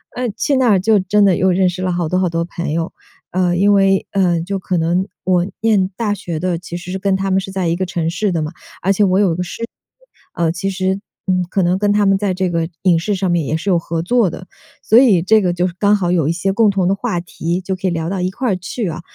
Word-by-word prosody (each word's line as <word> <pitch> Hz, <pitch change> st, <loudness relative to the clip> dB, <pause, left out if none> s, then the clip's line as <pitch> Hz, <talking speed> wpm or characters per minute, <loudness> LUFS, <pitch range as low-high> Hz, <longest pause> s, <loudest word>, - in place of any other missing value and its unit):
呃， 250 Hz, -1 st, -2 dB
去 280 Hz, +2 st, +1 dB
那 255 Hz, -2 st, +3 dB
儿 200 Hz, -3 st, +4 dB
就 210 Hz, +2 st, +3 dB
真 200 Hz, +2 st, +2 dB
的 190 Hz, -3 st, +3 dB
又 190 Hz, -, +2 dB
认 185 Hz, +1 st, +2 dB
识 180 Hz, +1 st, -6 dB
了 185 Hz, 0 st, 0 dB
好 175 Hz, -2 st, -1 dB
多 185 Hz, -, +1 dB
好 185 Hz, -1 st, +1 dB
多 165 Hz, 0 st, -1 dB
朋 170 Hz, -2 st, -5 dB
友。 165 Hz, 0 st, -2 dB, 0.4 s
呃， 180 Hz, -1 st, +1 dB
因 205 Hz, +2 st, +4 dB
为， 195 Hz, -1 st, +3 dB
呃， 180 Hz, -4 st, +2 dB
就 195 Hz, +2 st, -3 dB
可 185 Hz, -1 st, -2 dB
能 170 Hz, +4 st, 0 dB, 0.2 s
我 180 Hz, -1 st, +2 dB, 0.2 s
念 205 Hz, -4 st, +2 dB
大 220 Hz, -3 st, 0 dB
学 175 Hz, -5 st, -5 dB
的， 175 Hz, -1 st, -1 dB
其 175 Hz, -1 st, -7 dB
实 175 Hz, +1 st, -8 dB
是 190 Hz, -, -3 dB
跟 195 Hz, 0 st, +1 dB
他 195 Hz, 0 st, -1 dB
们 190 Hz, -, +3 dB
是 195 Hz, 0 st, -6 dB
在 190 Hz, -2 st, -1 dB
一 165 Hz, -, +1 dB
个 185 Hz, -, -2 dB
城 170 Hz, -3 st, -2 dB
市 205 Hz, +2 st, -1 dB
的 170 Hz, -, -1 dB
嘛， 155 Hz, -, -4 dB, 0.3 s
而 195 Hz, -, +3 dB
且 205 Hz, -, +2 dB
我 185 Hz, -1 st, +3 dB
有 190 Hz, -5 st, +3 dB
一 -, -, -3 dB
个 180 Hz, -, -3 dB
师 180 Hz, +6 st, -6 dB
姐， -, -, -2 dB, 0.7 s
呃， 165 Hz, -2 st, 0 dB
其 180 Hz, +3 st, -3 dB
实， 190 Hz, 0 st, -1 dB, 0.2 s
嗯， 185 Hz, -1 st, +1 dB
可 195 Hz, -, 0 dB
能 180 Hz, +2 st, +1 dB
跟 205 Hz, 0 st, +2 dB
他 205 Hz, 0 st, +2 dB
们 195 Hz, 0 st, +4 dB
在 195 Hz, 0 st, 0 dB
这 185 Hz, -1 st, -1 dB
个 165 Hz, -1 st, -1 dB
影 175 Hz, -3 st, +4 dB
视 205 Hz, +4 st, -1 dB
上 190 Hz, -1 st, -1 dB
面 170 Hz, -2 st, +1 dB
也 155 Hz, -, 0 dB
是 190 Hz, +4 st, -2 dB
有 175 Hz, -, +3 dB
合 165 Hz, 0 st, -3 dB
作 230 Hz, +1 st, +2 dB
的， 185 Hz, +3 st, -9 dB, 0.4 s
所 225 Hz, +3 st, +6 dB
以 200 Hz, -10 st, +4 dB
这 220 Hz, +3 st, +4 dB
个 180 Hz, -3 st, +1 dB
就 180 Hz, +1 st, 0 dB
是 175 Hz, -, -6 dB
刚 205 Hz, 0 st, +4 dB
好 180 Hz, -4 st, 0 dB
有 165 Hz, -5 st, +1 dB
一 -, -, +2 dB
些 190 Hz, +3 st, -1 dB
共 215 Hz, +1 st, +4 dB
同 195 Hz, -3 st, +1 dB
的 195 Hz, -, +3 dB
话 195 Hz, -3 st, -2 dB
题， 170 Hz, 0 st, -3 dB
就 190 Hz, 0 st, -3 dB
可 185 Hz, +1 st, -3 dB
以 -, -, +1 dB
聊 165 Hz, -1 st, -2 dB
到 185 Hz, +1 st, -2 dB
一 180 Hz, -, 0 dB
块 225 Hz, +1 st, -1 dB
去 185 Hz, +4 st, -4 dB
啊。 160 Hz, +1 st, -6 dB
185 Hz, 305 characters per minute, -18 LUFS, 175-195 Hz, 0.7 s, 所